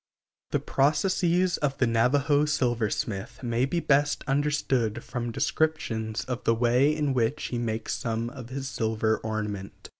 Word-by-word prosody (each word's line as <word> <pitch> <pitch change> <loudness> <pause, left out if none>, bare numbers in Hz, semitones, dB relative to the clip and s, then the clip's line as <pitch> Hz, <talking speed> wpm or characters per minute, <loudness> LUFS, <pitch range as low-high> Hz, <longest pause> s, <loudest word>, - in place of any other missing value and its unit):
The - - +1
processes 175 +5 +2
of 140 -2 -1
the 130 - +3
Navajo 140 +6 +3
silversmith 120 -4 -1
may 120 +1 +1
be 170 +6 -1
best 145 -2 +2
understood 135 -5 0
from 120 -1 -4
descriptions 125 -5 -1
of 125 -1 -4
the 115 - +3
ways 125 +6 +3
in 145 -3 +1
which 125 +3 0
he 120 - -2
makes 115 -1 -2
some 115 0 -2
of 125 -4 -9
his 135 +1 -4
silver 110 -3 0
ornament. 105 -3 -5
125 Hz, 145 wpm, -27 LUFS, 115-145 Hz, -, the